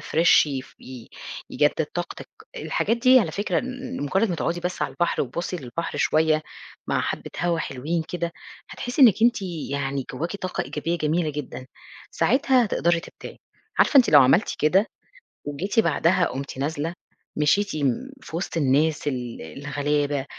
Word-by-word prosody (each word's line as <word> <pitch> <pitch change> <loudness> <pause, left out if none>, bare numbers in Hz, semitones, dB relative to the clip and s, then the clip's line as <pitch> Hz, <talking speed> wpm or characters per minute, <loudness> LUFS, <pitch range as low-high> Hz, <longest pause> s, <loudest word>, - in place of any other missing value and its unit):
fresh 160 +1 +4
ي 135 -3 -3 0.2
ي-يجدد 125 -3 -3
طاقتِك. - - -5 0.3
الحاجات 230 +3 0
دي 255 +2 +6
على 165 - -1
فكرة 205 +6 -1
م 255 - -5
مجرد 195 +8 +1
ما 175 - -1
تُقعدي 170 +2 -2
بس 180 +1 -3
على - - -1
البحر 175 -1 0
وتبُصي 170 +7 -4
للبحر 165 +4 -5
شوية 155 0 +2 0.4
مع - - +1
حبّة - - -4
هوا 170 -1 +1
حلوين 155 +4 -2
كده، 170 -1 -3 0.4
هتحسّي 245 +3 -1
إنّك 220 -3 +6
أنتِ 235 -3 +3 0.3
يعني 135 -1 -2
جواكِ 170 +6 -3
طاقة 185 -2 -3
إيجابية 170 +1 -3
جميلة 155 +1 0
جدًا، 135 -3 -7 0.4
ساعتها 260 -3 +3
تقدري 170 -3 +1
تبدعي. - - -11 0.4
عارفة 285 - +4
أنتِ 255 - +6
لو 145 -2 +9
عملتِ 165 - +3
كده 185 +8 +3 0.6
وجيتِ 170 +10 -1
بعدها 180 -3 +3
قُمتِ 135 -2 -5
نازلة، 150 +4 -2 0.4
مشيتِ 200 +7 +2
م 145 - -1
في 160 - -9
وسط 170 -1 -3
الناس 150 +2 +2
ال 125 -4 -4
الغلابة، 145 - -2
165 Hz, 150 wpm, -24 LUFS, 145-190 Hz, 0.6 s, لو